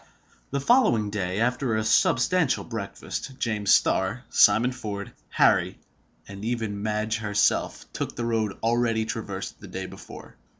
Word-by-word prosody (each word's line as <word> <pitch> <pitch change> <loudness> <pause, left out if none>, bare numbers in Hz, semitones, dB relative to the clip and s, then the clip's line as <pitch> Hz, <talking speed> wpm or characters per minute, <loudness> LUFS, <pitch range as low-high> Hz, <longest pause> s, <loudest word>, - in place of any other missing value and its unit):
The 140 - -1
following 135 - +3
day, 95 -1 -2
after 125 0 0
a 110 - 0
substantial 140 +7 +2
breakfast, 115 +4 -6
James 105 -6 0
Starr, 95 +7 +2
Simon 110 +5 +5
Ford, 105 -5 -6 0.2
Harry, - - +3 0.5
and 100 +1 -9
even 110 -3 -2
Madge 110 +1 -1
herself, 105 -2 0
took - - -4
the 120 - -3
road 110 -3 -1
already 115 -1 +1
traversed - - -5
the - - -11
day - - -5
before. - - -12
110 Hz, 135 wpm, -25 LUFS, 105-125 Hz, 0.5 s, Simon